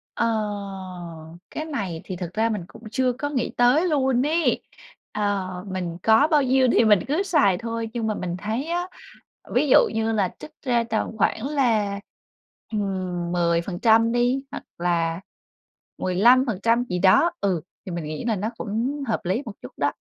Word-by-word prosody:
Ờ, - - +1 1.2
cái 310 - -5
này 200 - -4
thì 185 - -5
thực 175 -1 -6
ra 225 +2 +1
mình 210 -5 -2
cũng 225 +3 -15
chưa 255 0 +1
có 290 +4 -3
nghĩ 260 -5 -1
tới 255 +9 +4
luôn 265 -4 +2
ấy, 325 +2 +1 0.5
ờ, 205 -3 -1 0.2
mình 180 -3 -4
có 225 +7 +5
bao 300 -3 +3
nhiêu 260 0 +3
thì 230 - +4
mình 210 -3 +6
cứ 310 +8 +1
xài 290 - +3
thôi, 230 +1 -4
nhưng 230 -2 -2
mà 215 - 0
mình 175 -2 -3
thấy 220 +7 -3
á, 350 +2 -2 0.7
ví 280 +4 +3
dụ - - +8 0.2
như 225 0 0
là 200 -4 0
trích 150 - -10
ra 240 -4 +2
tầm 220 0 -2
khoảng 220 +4 +1
là, 225 -9 +1 0.7
ừm, 185 -4 -2
10% 180 +7 +2
đi 245 +3 +1
hoặc 290 - -7
là 170 -1 0 0.8
15% 230 +3 +3
gì 180 -7 -3
đó, 190 - +5
ừ, 185 -4 0 0.3
thì 185 - -5
mình 170 -2 -4
nghĩ 155 +5 -5
là 225 -3 0
nó 210 +4 -2
cũng 240 +7 -2
hợp 220 - 0
lý 190 +9 0
một 220 - -5
chút 125 - -9
đó. 145 0 +1
220 Hz, 175 wpm, -24 LUFS, 185-255 Hz, 1.2 s, dụ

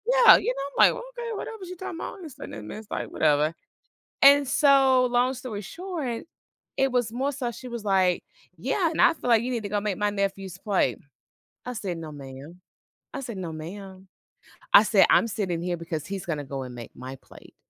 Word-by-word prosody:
Yeah, - - +9
you - - -1
know, 280 0 +1
I'm - - +4
like, - - -7
"Okay, 480 -2 -7
whatever 435 -3 -6
she 365 - -8
talking 345 -2 -7
about, 375 - -7
this 310 -6 -10
then - - -9
and 105 -1 -8
this" 215 0 -8
like, - - -3
"Whatever." 155 +1 +2 0.7
And 280 0 +7
so, 270 -2 +5
long 245 +1 +2
story 245 -5 -6
short, 305 - -5 0.5
it 270 0 +2
was 245 -3 0
more 265 +4 -1
so 250 -3 -3
she 250 +3 -10
was, 235 -3 -6
like, 185 -3 +2 0.3
"Yeah, 320 - 0
and 320 - -5
I - - +6
feel 250 - -5
like 230 -1 +5
you 255 - -2
need 235 - -1
to 205 - -4
go 205 0 0
make 205 -3 -2
my 210 0 +1
nephew's 195 -2 -3
plate." 200 -1 0 0.7
I 250 - -3
said, 190 -6 -4
"No, 155 -2 -7
ma'am." 140 +5 -11 0.5
I - - -3
said, 240 -5 -6
"No, 170 -3 -5
ma'am." 190 +4 -9 0.7
I 205 - +11
said, 205 -3 +5
"I'm - - +5
sitting 190 -5 -2
here 175 -1 -2
because 165 -2 -5
he's 195 -2 -5
gonna 150 -4 -3
go 135 0 -5
and 125 -1 -9
make 120 -1 -9
my 130 +1 -8
plate." - - -17
210 Hz, 210 wpm, -26 LUFS, 175-270 Hz, 0.7 s, I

